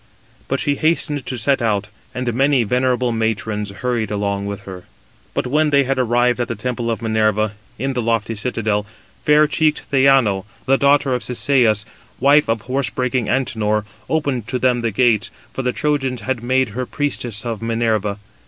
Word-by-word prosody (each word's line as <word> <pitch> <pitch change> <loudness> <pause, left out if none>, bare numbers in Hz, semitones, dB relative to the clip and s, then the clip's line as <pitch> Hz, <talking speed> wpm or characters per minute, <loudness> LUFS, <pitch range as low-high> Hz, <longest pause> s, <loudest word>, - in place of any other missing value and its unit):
But - - -1
she 145 -1 0
hastened 155 -3 0
to 130 - -3
set 135 +4 +1
out, 105 -2 0 0.3
and 125 -1 -2
many 135 +1 +3
venerable 125 +2 +1
matrons 110 -2 -2
hurried 115 +1 -2
along 100 -1 -2
with 100 0 -5
her. 95 -2 -10 0.5
But - - 0
when 150 +4 +2
they 140 -1 +3
arrived 125 -2 +1
at 120 - -1
the 115 - -3
temple 120 +2 -3
of 115 -1 -2
Minerva, 110 -1 +1 0.3
in 135 +4 -2
the 125 - -1
lofty 115 -1 0
citadel, 105 -2 -1 0.4
fair 150 +1 +5
cheeked 155 0 +1
Theano, 130 -8 +4 0.2
the 135 +1 +3
daughter 140 -1 +3
of 125 - -2
Cisseus, 120 -5 +2 0.3
wife 140 0 +4
of 115 -1 0
horse 130 +3 -2
breaking 125 -2 -1
Antenor, 110 -4 0 0.2
opened 140 -8 -1
to 125 - -1
them 125 -1 +2
the 115 - 0
gates; 110 -2 +2 0.2
for - - -3
the 125 -1 0
Trojans 135 -4 -1
had 130 -3 -2
made 130 +1 +1
her 125 +4 -4
priestess 125 -6 -1
of 115 -3 -3
Minerva. 110 -3 0
120 Hz, 170 wpm, -19 LUFS, 110-135 Hz, 0.5 s, fair